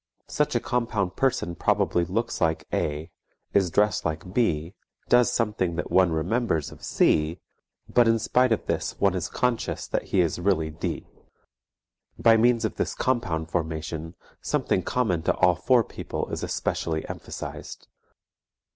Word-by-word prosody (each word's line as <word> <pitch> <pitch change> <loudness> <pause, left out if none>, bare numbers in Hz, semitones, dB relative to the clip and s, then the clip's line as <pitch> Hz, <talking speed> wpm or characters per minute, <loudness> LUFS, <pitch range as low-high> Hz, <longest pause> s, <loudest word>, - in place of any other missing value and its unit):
Such 150 -2 0
a - - +4
compound 115 -7 -1
person 130 -10 0
probably 85 +1 +1
looks 115 +6 -2
like 80 -1 +1
A., 75 +3 -2 0.4
is 95 -3 +3
dressed 105 +5 +2
like 80 +3 -4
B., 85 -7 0 0.4
does 125 0 +5
something 105 -7 0
that 85 - -4
one 95 -2 +4
remembers 80 - 0
of - - -14
C., 75 +2 +2 0.5
but 120 -1 +4
in 115 0 +4
spite 125 +2 +2
of 110 - 0
this - - -2
one 100 -2 +3
is 90 -3 -2
conscious 125 -2 -1
that - - -2
he 95 - +2
is 85 -1 0
really 85 -4 +1
D. 80 - -4 1.1
By 115 -1 +5
means 115 0 +3
of - - -3
this - - -1
compound 85 -11 -1
formation 80 0 -3 0.3
something - - 0
common 95 -7 0
to - - +1
all 90 -1 +4
four 120 +8 +3
people - - -5
is - - -3
especially 80 -1 -2
emphasized. - - -7
95 Hz, 150 wpm, -26 LUFS, 80-115 Hz, 1.1 s, does